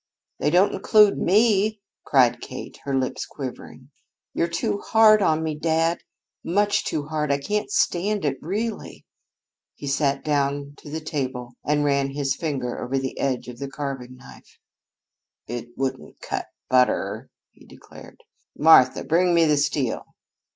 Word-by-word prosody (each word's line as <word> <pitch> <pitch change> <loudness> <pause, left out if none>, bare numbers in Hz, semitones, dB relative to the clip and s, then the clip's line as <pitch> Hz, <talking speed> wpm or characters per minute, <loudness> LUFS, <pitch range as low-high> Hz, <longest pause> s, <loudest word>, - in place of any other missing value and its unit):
"They - - +1
don't 180 +5 +3
include 210 +1 +4
me!" 215 +1 +3 0.2
cried 125 -3 +3
Kate, 130 - -8
her 140 -1 -1
lips 130 -1 -2
quivering. 130 0 -9 0.4
"You're 170 - 0
too 170 +4 -2
hard 215 -1 +5
on 160 -4 +2
me, 160 -1 -2
dad, 165 +2 0 0.4
much 205 +4 +1
too 150 - -2
hard. 150 -2 -1
I 140 - +2
can't 210 - -2
stand 205 - 0
it, 135 -2 0
really." 210 +6 -4 0.7
He - - -9
sat 140 0 0
down 140 -1 -1
to - - -12
the 160 +2 -4
table 130 -5 -4
and 150 0 +1
ran 140 -1 +1
his 140 -2 0
finger 135 -7 -3
over 135 +2 -2
the 135 -1 -4
edge 130 -3 -1
of 125 -1 -9
the 140 - -5
carving 135 -3 -6
knife. 130 - -16 0.9
"It 120 +1 -6
wouldn't 130 -1 -4
cut - - -4 0.2
butter," 125 -1 +1 0.2
he - - -21
declared. - - -15 0.4
"Martha, 150 -5 +6
bring 175 +2 +2
me 165 -1 +5
the 150 -1 +3
steel!" 145 -4 -1
145 Hz, 150 wpm, -23 LUFS, 135-170 Hz, 0.9 s, Martha